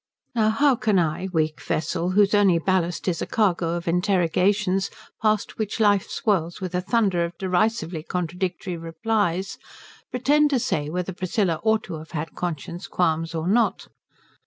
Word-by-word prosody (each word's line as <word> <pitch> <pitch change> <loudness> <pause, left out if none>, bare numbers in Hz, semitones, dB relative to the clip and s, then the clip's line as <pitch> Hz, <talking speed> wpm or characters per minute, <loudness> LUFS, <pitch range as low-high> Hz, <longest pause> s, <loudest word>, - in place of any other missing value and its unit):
Now 220 -3 +3
how 270 +5 +3
can 215 -2 +2
I, 170 +2 0
weak 155 -2 0
vessel 165 +3 -1
whose 205 0 +5
only 200 -4 +5
ballast 175 0 0
is 175 -3 0
a - - -2
cargo 175 -6 +1
of 170 0 -5
interrogations 185 +2 +1 0.3
past 215 -1 0
which 215 +1 -2
life 205 -3 +3
swirls 175 -6 0
with 185 -1 -5
a 180 - 0
thunder 195 -4 +1
of 170 0 -5
derisively 185 -3 0
contradictory 180 +1 -3
replies, 180 +3 -1 0.5
pretend 290 +4 +3
to 270 -3 +2
say 150 -9 -1
whether 180 +3 -3
Priscilla 185 -2 0
ought 220 -1 +2
to 165 -4 -6
have 160 +2 -13
had 155 0 -4
conscience 170 +1 -5
qualms 165 -1 0
or 160 +1 -2
not? 230 +5 +1
180 Hz, 160 wpm, -24 LUFS, 170-210 Hz, 0.5 s, whose